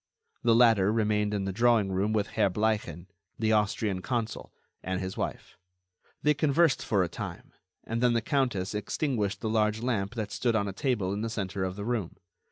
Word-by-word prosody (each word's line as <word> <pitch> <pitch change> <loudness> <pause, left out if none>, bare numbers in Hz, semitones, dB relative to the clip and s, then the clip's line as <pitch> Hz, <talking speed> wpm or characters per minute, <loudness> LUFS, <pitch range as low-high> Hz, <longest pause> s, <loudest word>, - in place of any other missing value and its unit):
The 115 -1 +4
latter 110 -5 +5
remained 105 -2 +1
in 100 -2 -1
the 95 - -1
drawing 115 -1 +3
room 95 +3 0
with 105 -2 0
Herr 105 -3 +2
Bleichen, 105 -4 -1 0.3
the 110 -1 +1
Austrian 105 -2 0
consul, 115 0 -3 0.3
and 95 0 -2
his 95 0 -4
wife. - - -5 0.7
They 150 - +4
conversed 150 +1 +2
for 100 -5 +2
a - - -1
time, 85 - -7 0.3
and 115 +1 -3
then 125 -1 +4
the 115 - +1
countess 120 -10 0
extinguished 105 0 -1
the 110 - -2
large 110 0 +1
lamp 115 -4 -1
that 110 -3 -3
stood 120 0 0
on 100 -2 +1
a 100 - -4
table 105 -5 -1
in 100 - -3
the 115 - -2
centre 100 -3 -3
of 95 0 -3
the 100 0 -5
room. 115 -7 -2
105 Hz, 190 wpm, -28 LUFS, 100-115 Hz, 0.7 s, latter